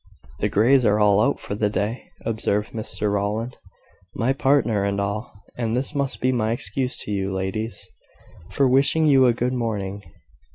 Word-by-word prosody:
"The - - 0
Greys 125 +6 +4
are 105 -1 +3
all 105 -1 +4
out - - +1
for - - -6
the 105 0 0
day," 105 +4 -3 0.2
observed 110 -2 -1
Mr 105 -2 -2
Rowland; 105 +4 -2 0.6
"my 125 +4 +1
partner 135 -7 +2
and 100 0 -1
all; 100 +3 -3 0.2
and 115 -1 -1
this 130 +3 -1
must 140 -2 -1
be 130 - +2
my 115 -3 0
excuse 125 +3 -2
to - - -6
you, 95 -1 -1
ladies, 95 +4 -3 0.6
for 140 - +2
wishing 140 +5 +3
you 135 -4 +5
a 120 - +4
good 125 +2 -1
morning. 105 -5 -3
110 Hz, 170 wpm, -23 LUFS, 105-125 Hz, 0.6 s, you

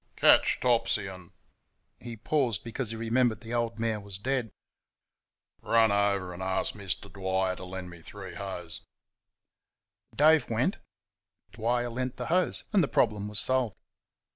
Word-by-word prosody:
"Catch - - +5
Topsy 115 -4 +2
and 95 -3 -9 0.4
" - - -48 0.3
He 120 -2 -8
paused 120 -4 0
because 120 0 -3
he 115 - -3
remembered 115 -1 +1
the 115 0 -7
old 115 -1 -1
mare 115 -1 -1
was 100 -2 -6
dead. 125 +2 -1 1.1
"Run 115 -2 +4
over 100 -3 +1
and 90 - -8
ask 95 0 -1
Mister 95 -1 -4
Dwyer 95 -1 -1
to - - -8
lend 90 -1 -7
me 85 -1 -12
three 95 +2 -9
hoes." 90 -4 -6 1.3
Dave 155 -2 +5
went; 125 - 0 0.7
Dwyer 120 +2 0
lent 125 +2 -3
the - - -4
hoes; 185 0 +1
and 195 -4 +5
the - - +1
problem 105 -6 +1
was 105 0 -4
solved. 125 -3 0
110 Hz, 150 wpm, -29 LUFS, 95-120 Hz, 1.3 s, Catch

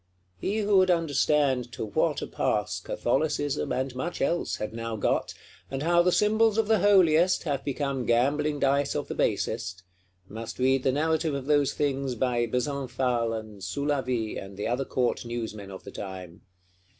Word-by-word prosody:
He 200 - -1
who 205 -1 +3
would 185 0 +5
understand 145 -6 +2
to 110 - -4
what 105 - 0
a - - -2
pass - - -1
Catholicism, 145 +2 -1
and 130 0 -1
much 165 +7 -4
else, 170 - 0
had 105 - -5
now 115 0 -4
got; 105 - 0 0.3
and 135 +1 -3
how 170 +1 +4
the 180 +1 +3
symbols 215 +2 +3
of 225 -2 +2
the 220 -1 +3
Holiest 185 -3 +4
have 140 -4 -2
become 140 -2 -2
gambling 145 +5 +2
dice 140 +1 +1
of - - -2
the - - -2
Basest,—must 95 +4 -4
read 130 +1 +2
the 130 - +2
narrative 160 +1 0
of 135 -2 -4
those 145 -1 +2
things 135 -3 -1
by 120 -1 0
Besenval, 125 -2 -1
and 110 -2 -10
Soulavie, 130 0 -1
and 95 0 -11
the 105 - -3
other 125 +4 -1
Court 125 -2 0
Newsmen 110 -4 -5
of 95 -1 -9
the - - -9
time. 95 -2 -8
135 Hz, 165 wpm, -27 LUFS, 115-150 Hz, 0.3 s, would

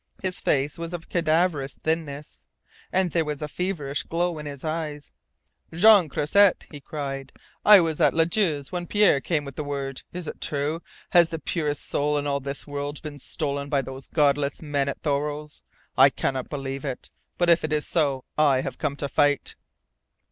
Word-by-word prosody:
His 185 -1 -1
face 140 +3 0
was 170 +1 -5
of 170 -2 -7
cadaverous 160 -4 +1
thinness, 155 -2 -3 0.5
and 185 -2 +1
there 165 0 +2
was 150 -2 -4
a 150 - -3
feverish 150 -4 -2
glow 170 -1 -2
in 150 - -6
his 140 -2 -8
eyes. 155 -2 -4 0.6
"Jean 195 -1 +6
Croisset!" 185 +8 +3
he 145 -2 -9
cried. 135 -2 -5 0.3
"I 210 -3 +9
was 160 -2 -1
at - - +4
Ladue's 165 -3 +1
when 175 -1 -4
Pierre 205 -9 +4
came 150 -2 -1
with 140 -1 -9
the 150 - -2
word. 140 -2 -4
Is 175 -2 -6
it - - -7
true? 150 +3 -1 0.3
Has 170 -2 +6
the 165 - -3
purest 150 -2 -3
soul 150 +1 0
in 145 - -2
all 140 -1 0
this 140 +1 -5
world 145 0 -4
been 145 -2 -7
stolen 140 0 -3
by 140 -2 +1
those 135 0 -8
Godless 145 -2 +1
men 145 -3 -1
at - - -5
Thoreau's? 150 0 -2 0.3
I - - +7
cannot 130 -2 -2
believe 135 -2 -4
it! 135 -4 -5 0.3
But 175 -1 +4
if 170 - +4
it 155 - -2
is 150 -1 0
so, 140 -5 0
I 140 -4 +4
have - - -6
come 145 -2 -1
to 145 - -3
fight!" 145 0 +1
150 Hz, 185 wpm, -25 LUFS, 140-165 Hz, 0.6 s, I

